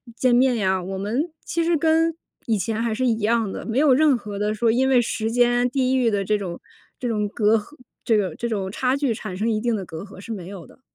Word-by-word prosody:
见 250 Hz, 0 st, +2 dB
面 255 Hz, 0 st, +4 dB
呀， 190 Hz, -4 st, +1 dB
我 190 Hz, +2 st, -5 dB
们 240 Hz, -, -2 dB
其 335 Hz, -, -1 dB
实 335 Hz, 0 st, +2 dB
跟， 325 Hz, +1 st, +2 dB, 0.3 s
以 225 Hz, -2 st, +2 dB
前 220 Hz, +4 st, -2 dB
还 230 Hz, -1 st, 0 dB
是 255 Hz, +3 st, 0 dB
一 230 Hz, -3 st, +2 dB
样 225 Hz, -1 st, +1 dB
的， -, -, -6 dB
没 230 Hz, +1 st, -2 dB
有 285 Hz, -1 st, +5 dB
任 290 Hz, -1 st, +4 dB
何 205 Hz, -3 st, -7 dB
的 210 Hz, 0 st, 0 dB
说 230 Hz, +1 st, +2 dB
因 260 Hz, +3 st, +2 dB
为 255 Hz, -2 st, +5 dB
时 225 Hz, -1 st, -1 dB
间、 245 Hz, +1 st, +3 dB
地 260 Hz, 0 st, +1 dB
域 250 Hz, -3 st, +3 dB
的 200 Hz, -2 st, -1 dB
这 210 Hz, +2 st, +1 dB
种 175 Hz, -4 st, -5 dB, 0.4 s
这 250 Hz, -, -3 dB
种 210 Hz, -3 st, 0 dB
隔 215 Hz, +1 st, +2 dB
阂 220 Hz, +8 st, -9 dB, 0.3 s
这 225 Hz, -, +3 dB
个 190 Hz, -5 st, -1 dB
这 235 Hz, -, -3 dB
种 195 Hz, -3 st, -2 dB
差 255 Hz, +5 st, 0 dB
距 280 Hz, -4 st, 0 dB
产 210 Hz, -3 st, -6 dB
生 215 Hz, -, -1 dB
一 215 Hz, -, 0 dB
定 235 Hz, -1 st, 0 dB
的 195 Hz, -3 st, -4 dB
隔 160 Hz, -1 st, -8 dB
阂 200 Hz, -1 st, -12 dB
是 230 Hz, -, -8 dB
没 185 Hz, -5 st, -7 dB
有 190 Hz, -3 st, -9 dB
的。 -, -, -20 dB
225 Hz, 280 characters per minute, -23 LUFS, 205-255 Hz, 0.4 s, 有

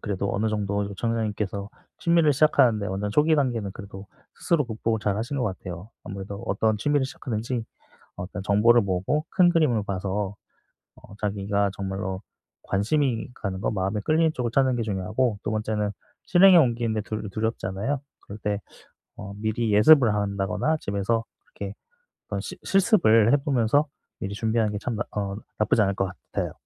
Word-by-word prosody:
그래도 100 Hz, -1 st, -2 dB
어느 110 Hz, +2 st, +1 dB
정도 100 Hz, -1 st, -1 dB
요청자님께서 105 Hz, -1 st, -2 dB, 0.3 s
취미를 170 Hz, -3 st, +3 dB
시작하는데 125 Hz, -7 st, +3 dB
어느 100 Hz, +2 st, -2 dB
초기 150 Hz, +8 st, +4 dB
단계는 120 Hz, -8 st, 0 dB
그래도 100 Hz, 0 st, -10 dB, 0.3 s
스스로 165 Hz, -4 st, +1 dB
극복을 110 Hz, 0 st, -1 dB
잘하신 110 Hz, +7 st, -1 dB
것 125 Hz, -, 0 dB
같아요. 95 Hz, 0 st, -6 dB
아무래도 100 Hz, 0 st, -6 dB
어떤 110 Hz, +2 st, +1 dB
취미를 145 Hz, +5 st, +1 dB
시작하든지 120 Hz, -2 st, -4 dB, 0.5 s
어떤 95 Hz, +2 st, -6 dB
정보를 110 Hz, +4 st, +5 dB
모으고 100 Hz, -, -1 dB
큰 180 Hz, -2 st, +4 dB
그림을 155 Hz, -, +2 dB
봐서 100 Hz, +1 st, -3 dB, 0.6 s
어 100 Hz, -, -15 dB
자기가 100 Hz, 0 st, 0 dB
정말로 95 Hz, -1 st, -4 dB, 0.4 s
관심이 120 Hz, +4 st, 0 dB
가는 95 Hz, -5 st, -4 dB
거 -, -, 0 dB
마음에 95 Hz, 0 st, -1 dB
끌리는 160 Hz, +6 st, +2 dB
쪽을 120 Hz, -4 st, -2 dB
찾는 130 Hz, 0 st, +3 dB
게 115 Hz, -, -1 dB
중요하고 105 Hz, +3 st, -1 dB
2 -, -, -1 dB
번째는 105 Hz, -1 st, -1 dB, 0.3 s
실행에 185 Hz, 0 st, +7 dB
옮기는 120 Hz, -6 st, +2 dB
게 110 Hz, -, 0 dB
두 105 Hz, -1 st, -5 dB
두렵잖아요. 110 Hz, +4 st, -2 dB, 0.3 s
그럴 100 Hz, -, -8 dB
때 105 Hz, -1 st, -1 dB, 0.6 s
어 100 Hz, 0 st, -7 dB
미리 110 Hz, +1 st, -1 dB
예습을 120 Hz, +2 st, +6 dB
한다거나 100 Hz, +9 st, 0 dB
집에서 100 Hz, +2 st, -1 dB, 0.2 s
그렇게 485 Hz, -, -8 dB, 0.5 s
어떤 -, -, -3 dB
시 -, -, -7 dB
실습을 170 Hz, -, +4 dB
해보면서 140 Hz, 0 st, +2 dB, 0.3 s
미리 100 Hz, -, -4 dB
준비하는 110 Hz, +1 st, 0 dB
게 105 Hz, -, -3 dB
참 115 Hz, +2 st, -3 dB
나 -, -, 0 dB
어 100 Hz, -1 st, -2 dB, 0.2 s
나쁘지 105 Hz, +1 st, +3 dB
않을 100 Hz, -1 st, +1 dB
것 95 Hz, -, +1 dB, 0.3 s
같아요. -, -, -2 dB
110 Hz, 370 characters per minute, -25 LUFS, 100-125 Hz, 0.6 s, 실행에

